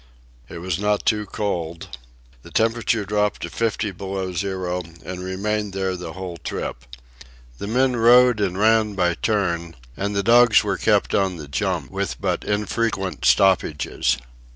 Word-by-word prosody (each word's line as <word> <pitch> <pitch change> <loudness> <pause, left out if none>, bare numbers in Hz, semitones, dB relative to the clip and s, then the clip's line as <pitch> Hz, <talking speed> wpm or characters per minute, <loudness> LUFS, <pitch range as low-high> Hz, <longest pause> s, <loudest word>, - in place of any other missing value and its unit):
It - - -8
was 90 0 -3
not 105 0 0
too 105 -2 +1
cold. 85 -10 -4 0.4
The - - -13
temperature 115 -1 +1
dropped 105 +1 0
to - - -5
fifty 110 -2 -1
below 95 0 -4
zero 90 -1 -2 0.2
and 90 0 -6
remained 100 +2 -2
there 95 -1 -1
the 90 -1 -7
whole 90 -2 -6
trip. - - -5 0.7
The 100 - -5
men 125 +3 +2
rode 120 0 +6
and 95 -3 -1
ran 110 0 +3
by 90 -2 +2
turn, 85 -5 -1 0.2
and 100 +3 -3
the 100 - +1
dogs 120 +1 +6
were 100 -3 -1
kept 105 -2 +2
on 95 -2 +1
the 75 -3 -8
jump, 70 - -2
with - - -3
but - - -1
infrequent 105 -4 -1
stoppages. 75 -7 +2
100 Hz, 155 wpm, -22 LUFS, 90-105 Hz, 0.7 s, rode